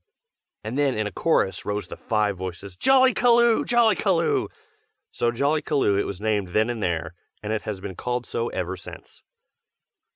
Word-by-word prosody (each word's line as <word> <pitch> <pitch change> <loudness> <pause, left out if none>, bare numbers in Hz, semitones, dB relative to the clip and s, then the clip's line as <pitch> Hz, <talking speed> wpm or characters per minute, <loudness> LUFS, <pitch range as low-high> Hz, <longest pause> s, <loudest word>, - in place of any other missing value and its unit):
And 115 +6 -4
then 140 -3 +2
in 110 - 0
a 105 - -3
chorus 95 - 0
rose 105 -1 -3
the - - -9
five 105 -2 0
voices, 95 +1 -7
"Jollykaloo! 245 - +4
Jollykaloo!" 215 -7 +2 0.6
so 120 - 0
Jollykaloo 140 -4 +1
it - - 0
was 95 - -6
named 105 -2 0
then 110 +6 +1
and 115 -2 -5
there, 85 -5 -2 0.3
and 105 +1 -2
it 110 - -1
has 100 -3 -4
been 100 -1 -6
called 125 +3 -3
so 115 - -2
ever 90 0 -3
since. 90 - -12
110 Hz, 160 wpm, -24 LUFS, 100-150 Hz, 0.6 s, Jollykaloo